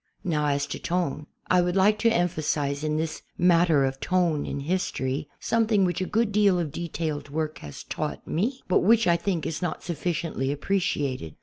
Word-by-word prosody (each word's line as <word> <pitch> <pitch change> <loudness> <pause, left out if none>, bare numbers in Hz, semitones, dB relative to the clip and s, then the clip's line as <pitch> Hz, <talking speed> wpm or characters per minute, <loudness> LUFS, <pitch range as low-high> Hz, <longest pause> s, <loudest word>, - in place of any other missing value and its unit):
Now, 150 -4 0
as 140 0 +1
to - - -6
tone. 170 -4 -2 0.2
I 180 - +4
would 175 +1 0
like 205 +2 +4
to 230 0 +3
emphasize 150 -6 0
in 155 0 0
this 160 0 -3 0.2
matter 170 -5 +4
of 135 0 -3
tone 175 -5 +1
in 140 - -3
history 145 -4 -2
something 220 -4 +2
which 180 +1 -1
a 185 - -1
good 225 -1 +1
deal 200 -3 +4
of 165 -4 -2
detailed 160 -3 -4
work 155 +1 -3
has 75 -1 -9
taught - - -4
me 235 - -1
but 185 - +4
which, 230 +4 +4
I 170 - +4
think, 170 -2 -1
is 160 - -3
not 175 -3 -3
sufficiently 165 -4 -2
ai)i)reciated. 140 - -1
170 Hz, 185 wpm, -26 LUFS, 145-185 Hz, 0.2 s, I